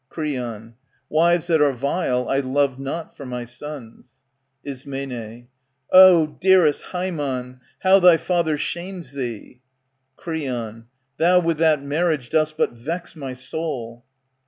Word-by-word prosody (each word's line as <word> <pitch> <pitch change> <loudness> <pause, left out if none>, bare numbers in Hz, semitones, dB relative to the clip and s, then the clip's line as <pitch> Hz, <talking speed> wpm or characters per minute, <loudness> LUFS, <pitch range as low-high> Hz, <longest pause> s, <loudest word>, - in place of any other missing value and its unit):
Creon, 120 -8 -5 0.4
Wives 170 +2 +3
that 165 -3 +2
are 145 -2 +4
vile 130 -1 -1
I 135 - +1
love 135 0 0
not 140 +5 -5
for - - -10
my 125 -2 -5
sons. 125 -1 -10 0.4
Ism, 130 -4 -7 0.5
Ah, 185 -3 +8
dearest 170 -1 +3
Haemon, 140 -9 -4 0.2
how 190 +1 +6
thy 180 -2 +7
father 170 -3 0
shames 175 -2 -5
thee! 125 -2 -6 0.6
Creon, 120 -9 -5 0.3
Thou 180 +2 +4
with 165 -2 -1
that 155 -3 +3
marriage 150 -3 -1
dost 155 -1 +1
but - - +1
vex 160 +11 -6
my 135 -4 -6
soul. 130 -3 -5
145 Hz, 125 wpm, -22 LUFS, 125-165 Hz, 0.6 s, Ah